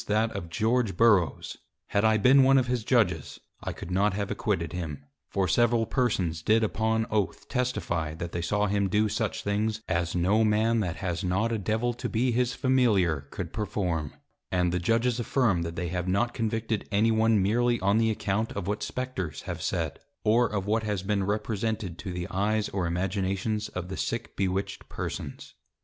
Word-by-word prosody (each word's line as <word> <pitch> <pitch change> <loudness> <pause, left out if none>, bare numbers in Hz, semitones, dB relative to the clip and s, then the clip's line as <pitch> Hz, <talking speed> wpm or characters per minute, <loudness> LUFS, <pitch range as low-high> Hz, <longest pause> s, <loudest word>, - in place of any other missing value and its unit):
_ - - -12
that 110 +2 +2
of 95 -4 -6
George 110 +1 +1
Burroughs; 105 -7 +3 0.3
had 100 - +1
I 110 0 +4
been 130 +5 +6
one 135 +1 +6
of 130 - +3
his 125 -2 -1
Judges, 100 - +1 0.2
I - - -3
could 90 - -8
not 100 +2 +2
have 100 -1 -2
acquitted 90 -7 -1
him: 75 -6 -5 0.2
For 95 -2 0
several 120 +4 +3
Persons 95 -11 0
did 110 +6 +3
upon 110 +1 +1
Oath 105 -3 -1
testifie, 85 - -1
that 85 0 -5
they 85 - -3
saw 105 +5 +1
him 100 -1 +1
do 105 +3 +2
such 105 +1 -2
things 110 +2 -1
as 85 0 -1
no 95 +6 +3
Man 110 +2 +2
that 90 -6 -1
has 90 +1 -3
not 100 +6 +1
a 115 - 0
Devil 110 +5 0
to 120 - -4
be 120 +3 +1
his 125 +1 +1
Familiar 100 - +2
could - - -6
perform: 90 -8 -2 0.4
And 90 -1 +2
the 90 - 0
Judges 115 +6 +1
affirm, 120 -7 +1
that 85 0 -4
they 85 -1 -3
have 90 +1 -2
not 120 +6 +1
convicted 115 -2 -2
any 110 +3 +3
one 110 -1 +3
meerly 120 +5 +2
on 100 +3 +2
the 115 0 +3
account 110 0 -1
of 100 -3 -4
what 105 +2 -2
Spectres 125 - -4
have - - -5
said, - - -2 0.2
or 115 +3 +4
of 100 -3 -3
what 110 +2 +1
has 105 -3 -2
been 100 -1 0
represented 105 -3 -2
to 90 - -5
the 90 0 -4
Eyes 105 +2 0
or 95 -3 -1
Imaginations 95 +4 -1
of 90 -1 -5
the 95 - -5
sick - - -3
bewitched 95 0 -2
Persons. 70 - -6
105 Hz, 190 wpm, -27 LUFS, 90-115 Hz, 0.4 s, been